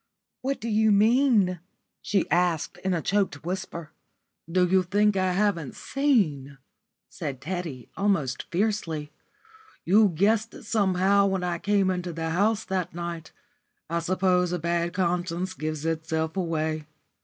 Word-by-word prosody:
"What 275 +2 -2
do 230 - -5
you 220 0 +3
mean?" 215 -3 +4 0.4
she 195 -3 0
asked 175 -1 +1
in 190 0 0
a 165 - -2
choked 195 -8 0
whisper. 175 -3 -5 0.6
"Do 180 +1 +3
you 190 +1 +4
think 205 +3 +2
I 185 -1 +1
haven't 185 -8 0
seen?" 170 - 0 0.5
said 145 -7 -6
Teddy, 160 -6 -5
almost 195 -11 0
fiercely. 170 -6 -1 0.7
"You 205 +4 +5
guessed 210 +6 +1
it - - -11
somehow 200 -1 +3
when 190 -2 -1
I 175 -1 -1
came 200 -1 +2
into 180 -1 -3
the 165 0 -3
house 210 +5 +1
that 185 -2 -3
night. 170 -1 -5 0.6
I 170 - +1
suppose 180 0 +1
a 180 - 0
bad 170 +1 -1
conscience 180 0 -1
gives 155 -3 -4
itself 160 0 -1
away. 160 -4 -2
180 Hz, 140 wpm, -26 LUFS, 165-200 Hz, 0.7 s, You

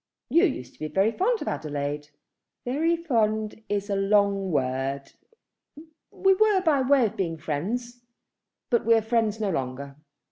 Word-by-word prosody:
"You 335 +4 +5
used 130 - -3
to - - -26
be 155 - -3
very 195 +7 +2
fond 440 - 0
of - - -10
Adelaide." 145 0 -3 0.6
"Very 320 +7 +1
fond 220 -9 -1
is 205 -1 -1
a 200 - -1
long 200 -1 +2
word. 135 0 -2 1.0
We 385 0 +3
were 415 -1 +3
by 310 -6 +2
way 260 -1 +4
of 215 0 -3
being 170 -5 -2
friends; 220 +12 -4 0.7
but 235 - +3
we 230 +1 +5
are 225 - +2
friends 225 -1 0
no 210 -3 0
longer." 135 -1 -4
210 Hz, 155 wpm, -26 LUFS, 155-250 Hz, 1.0 s, You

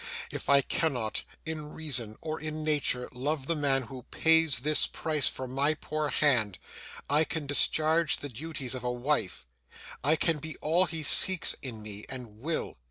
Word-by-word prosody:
If - - -6
I 140 0 +6
cannot, 125 -11 -1 0.2
in 155 -2 -6
reason 125 -9 -1
or 155 0 -4
in 155 0 -5
nature, 145 -5 0
love 135 +3 -3
the 165 - -1
man 140 -3 +1
who 125 +2 -9
pays 160 -2 +4
this 150 +2 +4
price 150 -5 -1
for 130 - -4
my 140 +4 0
poor 155 0 -3
hand, 115 -12 +2 0.5
I 150 +3 +4
can 160 -1 -4
discharge 155 +3 +3
the 145 - -7
duties 135 0 -6
of 130 -2 -6
a 125 - -1
wife: 125 - -2 0.6
I 150 +4 +3
can 160 0 +1
be 160 +1 -7
all 170 +4 +3
he 165 -2 -3
seeks 185 +4 +4
in 115 -5 -7
me, 105 0 -7
and 120 -5 -8
will. 155 - -4
145 Hz, 170 wpm, -28 LUFS, 125-155 Hz, 0.6 s, I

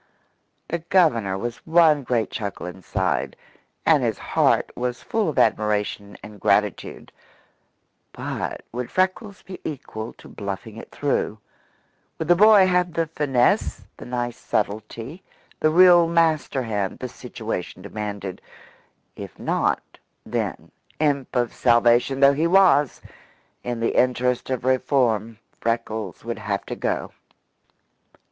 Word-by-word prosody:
The 170 - -1
Governor 150 - +2
was 120 +3 -4
one 160 -3 +4
great 120 -5 -1
chuckle 100 -4 -5
inside, 90 0 -2 0.5
and - - +5
his - - 0
heart - - +1
was 125 -1 -3
full 220 -6 0
of 150 - -5
admiration 105 -3 0
and 105 -1 -11
gratitude; - - 0 1.0
but - - -5
would 125 +1 -4
Freckles 190 +2 -1
be 185 0 -9
equal 115 -6 -6
to - - -16
bluffing 100 +2 -6
it - - -10
through? 140 -6 -1 0.8
Would 160 - -4
the 175 - +7
boy 210 0 +7
have 180 -2 +1
the 165 -1 0
finesse, 145 -6 +1
the - - -10
nice 120 -1 -3
subtlety, 110 - -3 0.4
the 155 - +3
real 175 0 +7
master 160 -5 +1
hand, 105 -4 -2
the 130 - -5
situation 115 -7 -6
demanded? 100 -2 -5 0.7
If - - -9
not, - - 0 0.4
then - - -4 0.3
imp 140 -4 0
of 120 -1 0
salvation 120 +2 +3
though 140 0 +7
he 155 +4 +1
was 180 -6 +4 0.6
in 120 -1 -3
the 115 - 0
interest 125 0 +1
of 130 -2 -2
reform, 125 -4 +1 0.2
Freckles 110 -4 -3
would 115 -1 -4
have 100 -1 -3
to - - -5
go. - - -2
125 Hz, 125 wpm, -23 LUFS, 110-160 Hz, 1.0 s, the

